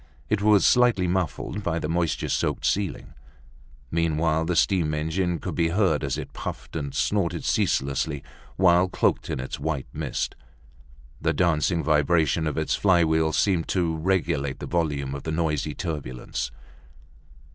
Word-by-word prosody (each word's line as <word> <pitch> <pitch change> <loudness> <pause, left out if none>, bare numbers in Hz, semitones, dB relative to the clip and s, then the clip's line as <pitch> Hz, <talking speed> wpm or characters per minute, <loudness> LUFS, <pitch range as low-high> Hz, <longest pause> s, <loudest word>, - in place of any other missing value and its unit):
It 105 -2 +2
was 105 -1 +5
slightly 120 -7 +4
muffled 90 +2 -2
by 85 -4 -1
the 75 - -2
moisture 85 0 -1
soaked - - -1
ceiling. 100 -3 -1 0.8
Meanwhile, 80 -1 +1
the 90 +1 -1
steam 85 -4 +2
engine 85 +3 -1
could - - -5
be 85 -1 +1
heard 85 -4 +1
as 70 -2 -1
it - - -7
puffed - - -7
and 70 -3 -3
snorted 100 -5 0
ceaselessly 70 +1 0 0.3
while 90 0 +4
cloaked - - 0
in - - -2
its 65 - -5
white 75 -5 -2
mist. - - -3 0.9
The 80 +1 +1
dancing 80 +1 +1
vibration 80 +1 +2
of 75 - -3
its - - 0
flywheel 80 -4 +3
seemed 85 +1 +1
to 85 -3 0
regulate 80 -5 0
the - - -6
volume 75 -6 -1
of 70 - -5
the 80 - -4
noisy 75 -2 -1
turbulence. 75 -9 -4
80 Hz, 145 wpm, -25 LUFS, 75-90 Hz, 0.9 s, was